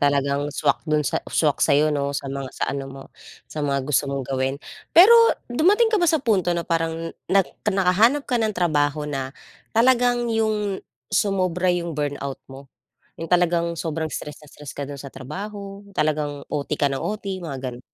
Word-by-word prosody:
talagang 140 0 +1
swak 145 - 0
do'n 150 -1 +2
sa - - 0
swak 150 -3 +1
sa'yo 150 +1 +3
'no? 140 -1 -1
Sa - - -4
mga 135 -1 -4
sa - - 0
ano 140 -1 -4
mo, 135 0 -9 0.4
sa 155 - -7
mga 140 -2 0
gusto 145 0 +1
mong 140 -1 -3
gawin. 135 +1 -1 0.4
Pero 375 +7 +10 0.4
dumating 415 - +3
ka 425 - +3
ba 345 - +3
sa 320 - +4
punto 200 -7 +2
na 170 - -2
parang 165 0 -2 0.2
nag 195 0 +4 0.2
nakahanap 210 +8 +3
ka 245 -3 0
ng 215 -2 -1
trabaho 150 -3 +1
na 135 -3 -3 0.5
talagang 245 0 +3
yung, 215 -3 0 0.3
sumobra 185 -3 +1
yung 170 -1 -1
burnout 145 -2 -3
mo? 135 +1 -11 0.5
Yung 165 +1 -7
talagang 170 -1 +2
sobrang 160 -1 -3
stress 150 -1 -5
na - - -15
stress 145 -2 -10
ka 145 - -4
do'n 140 0 -7
sa 140 - -8
trabaho, 195 +9 -7 0.2
talagang 150 -2 -1
OT 145 +1 -2
ka 145 -1 +1
ng 135 - -2
OT, 200 -2 -4
mga 160 -6 -5
ganon? 120 +1 -11
160 Hz, 180 wpm, -23 LUFS, 140-200 Hz, 0.5 s, Pero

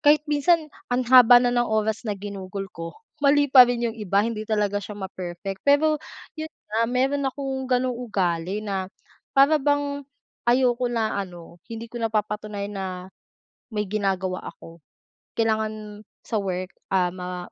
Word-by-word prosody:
Kahit 300 0 +5
minsan, 305 +1 +2 0.2
ang 250 +1 0
haba 250 -1 +9
na 245 - +2
ng 240 0 +1
oras 220 +1 0
na 205 - -1
ginugol 195 -1 -6
ko 165 0 -7 0.2
mali 285 -1 +3
pa 255 -2 +10
rin 240 -1 -1
yung 230 - 0
iba 205 -2 +1
hindi 215 -1 -4
talaga 205 -2 +1
siya 205 +1 -8
ma-perfect. 190 0 -6
Pero 295 +3 +3 0.4
yon 315 - -4 0.2
nga 225 +1 +2
mayro'n 270 +2 +1
akong 265 -1 -4
gano'ng 255 0 +1
ugali 195 -4 -2
na 190 -2 -2 0.5
para 280 +2 +6
bang, 285 0 0 0.5
ayoko 245 0 +3
na 225 -3 -1
ano 175 -2 -10
hindi 230 0 -6
ko 240 - -5
napapatunayan 210 -2 -2
na 190 - -2 0.8
may 210 -3 -2
ginagawa 190 -2 -2
ako. 165 0 -12 0.6
Kailangan 215 -2 -1 0.2
sa 220 - -1
work, 185 -1 -3 0.2
ah, 180 -1 +2
ma 180 0 -6
220 Hz, 150 wpm, -24 LUFS, 195-255 Hz, 0.8 s, pa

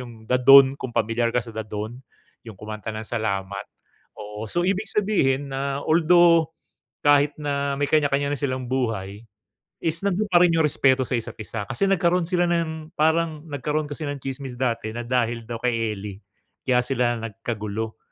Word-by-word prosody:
'yung 115 -3 -11
The 125 - +3
Dawn, 135 +1 +8
kung 125 -2 -5
pamilyar 115 +2 +1
ka 125 - +2
sa 115 - -10
The 110 - -4
Dawn, 105 +2 -5 0.5
'yung 110 -4 -10
kumanta 105 +1 -8
ng 110 +1 -6
Salamat. 100 -4 -3 0.5
Oo. 105 +1 -7
So, 175 +9 0
ibig 200 +3 0
sabihin 145 -11 +1
na 140 +1 -2
although 170 0 +5 0.6
kahit 145 0 +4
na 140 -1 -1
may 145 - +1
kanya-kanya 145 -2 +2
na 140 - -6
silang 130 -2 -2
buhay 110 -6 -2 0.6
is 165 0 0
nandun 200 +2 +1
pa 175 -1 +6
rin 175 -2 +5
'yung 160 - +3
respeto 135 -2 +3
sa - - -4
isa't-isa. 110 -1 -5
Kasi 195 - +1
nagkaroon 180 -2 +2
sila 175 -1 +2
ng 160 -1 -2
parang 160 0 +1
nagkaroon 150 +1 -2
kasi 145 +2 -6
ng 145 - -4
tsismis 135 -1 -6
dati 115 -4 -1
na 120 - -4
dahil 120 -2 0
daw 115 0 -6
kay 115 -3 0
Ely, 100 -1 -7 0.5
kaya 125 -2 +3
sila 125 -2 0
nagkagulo. 110 0 -5
130 Hz, 170 wpm, -24 LUFS, 115-155 Hz, 0.6 s, Dawn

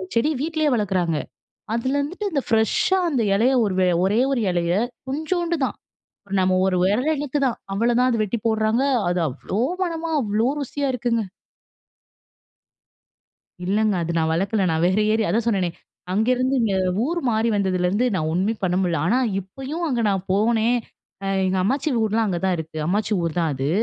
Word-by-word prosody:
செடி 265 +7 +2
வீட்லயே 315 -1 0
வளக்குறாங்க. 185 -7 0 0.6
அதில 260 +4 0
இருந்துட்டு 370 +8 -3
இந்த 280 -3 0
பிரஷ்‌ஷா 225 - +2
அந்த 265 -6 0
எலைய, 245 +6 +3
ஒரு 195 -3 -1 0.3
ஒரே 205 +4 +2
ஒரு 250 -4 +1
எலைய 175 -1 0 0.3
கொஞ்சோண்டு 335 +5 -1
தான் - - -5 0.6
நம்ம 185 0 +2
ஒரு 185 - +1
விரல் 240 +11 +2
இனுக்கு 290 0 -2
தான், 245 - -1 0.2
அவ்வள 230 +5 +1
தான் 255 - +4
அத 230 - +1
வெட்டிப் 210 +2 -3
போடுறாங்க, 220 +2 +2 0.3
அது 175 0 0
அவ்ளோ 160 +9 -5 0.2
மனமா 330 -2 -2
அவ்ளோ 215 -1 0
ருசியா! 280 +1 -3
இருக்குங்க. 235 -2 0 2.4
இல்லங்க. 210 +3 +1
அது 170 - -3
நான் 160 0 +1
வளக்கலை. 195 +4 0
நான் 160 0 0
வேற 190 +3 +2
ஏரியா 220 -4 +1
அதான் 225 +4 0
சொன்னேனே, 195 -6 +1 0.4
அங்கேருந்து 255 +5 +1
இங்க 205 -4 +1 0.3
ஊர் 340 +4 -1
மாறி 220 +1 +1
வந்ததுலேருந்து 190 +3 +1
நான் 155 -4 -1
ஒண்ணுமே 190 +6 +1
பண்ண 180 -1 +1
முடில. 170 -4 0
ஆனா 240 +7 +3 0.2
இப்பயும் 270 - -6
அங்க 250 -5 0
நான் 195 -2 0
போனேன், 225 +3 +2 0.5
அ - - -3 0.2
எங்க 190 0 0
அம்மாச்சி 270 +9 0
ஊர்லாம் 220 +1 +1
அங்க 180 -4 -1
தான் 185 -1 +2
இருக்கு. 160 0 -7
அம்மாச்சி 210 +4 0
ஊர் 165 0 -2
தான் 165 -2 +1
அது. 135 +2 -2
220 Hz, 165 wpm, -22 LUFS, 185-260 Hz, 2.4 s, தான்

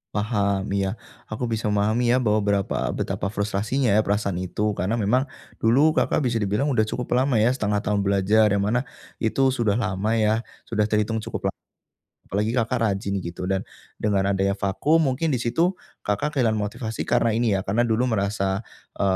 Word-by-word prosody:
Paham, 100 -2 0
iya, 100 +2 -1 0.3
aku 120 +3 -2
bisa 110 -2 -1
memahami 110 +4 +2
ya 130 - +4
bahwa 110 -4 +1
berapa 100 -1 0 0.2
betapa 100 +2 -3
frustrasinya 105 +3 0
ya 110 - +4
perasaan 100 -2 0
itu, 105 +3 -1
karena 105 +6 -1
memang 120 +6 +2 0.3
dulu 140 +8 +3
Kakak - - +2
bisa 120 - -1
dibilang 105 +6 0
udah 120 -6 +2
cukup 125 +3 -2
lama 130 -3 +2
ya 110 - +4
setengah 105 -4 0
tahun 100 -1 0
belajar, 100 +2 +3
yang 100 - +2
mana 120 +4 +1 0.4
itu 135 +4 +2
sudah 115 -2 +1
lama 105 0 -1
ya, 110 +2 +2 0.2
sudah 105 -2 +1
terhitung 105 +1 0
cukup 115 - -3
la - - 0 0.8
apalagi 105 +4 0
Kakak 120 +1 +1
rajin 100 -3 -1
gitu, 85 0 -6
dan 95 -1 -1 0.3
dengan 100 -2 +1
adanya 100 0 +1
vakum 145 +12 +1
mungkin 140 +2 0
di - - 0
situ, 170 +10 +1 0.3
Kakak 105 +9 0
kehilangan 110 -3 +2
motivasi 110 +2 -4
karena 115 - +2
ini 110 -4 +2
ya, 95 - -6
karena 110 +5 +2
dulu 120 +2 +1
merasa 100 -2 0 0.3
e - - -4
110 Hz, 180 wpm, -24 LUFS, 100-120 Hz, 0.8 s, ya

